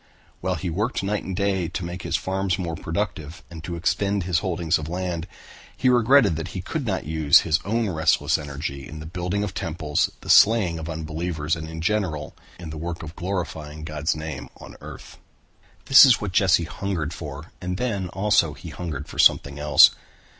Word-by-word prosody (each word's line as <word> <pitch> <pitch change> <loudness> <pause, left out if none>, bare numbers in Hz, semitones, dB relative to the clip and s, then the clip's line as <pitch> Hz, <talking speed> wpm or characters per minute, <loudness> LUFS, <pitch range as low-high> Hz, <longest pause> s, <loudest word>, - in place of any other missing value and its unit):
While 95 0 -1
he 85 +2 -4
worked 105 +6 -1
night 105 +1 -1
and 95 - -5
day 95 -2 0
to 85 - -5
make 90 +1 -6
his - - -2
farms 95 -1 -1
more 85 -3 -3
productive 80 -2 -4
and 80 -1 -9
to 85 +1 -5
extend 100 +3 0
his 90 -1 +1
holdings 85 -4 0
of 80 0 -6
land, 90 -1 -3 0.5
he 130 - +2
regretted 120 - +4
that 80 +2 -4
he - - -3
could 140 - -4
not 95 -4 -2
use 80 -2 +5
his 80 0 +1
own 115 +3 0
restless 80 -4 +2
energy 70 -2 -6
in 75 - -9
the 80 - -8
building 90 +4 -2
of 100 -3 -4
temples, 80 -3 -1
the - - -10
slaying 100 -7 +5
of 80 +1 -6
unbelievers 80 0 -3
and 80 -1 -7
in 80 0 -6
general 85 -6 -1 0.2
in 85 -3 -8
the 80 - -7
work 85 0 -5
of 80 +1 -9
glorifying 80 -5 -4
God's 75 0 -2
name 80 0 -6
on - - -12
earth. - - -11 0.7
That 135 - +9
is 130 -4 +6
what 105 -3 -4
Jesse 90 -2 +3
hungered 85 -2 -3
for 75 -1 -8
and 90 0 -3
then 100 -6 -2
also 95 -5 +2
he 70 +4 -10
hungered 75 -2 -6
for - - -9
something 70 0 +4
else. 75 0 +7
85 Hz, 190 wpm, -24 LUFS, 80-95 Hz, 0.7 s, That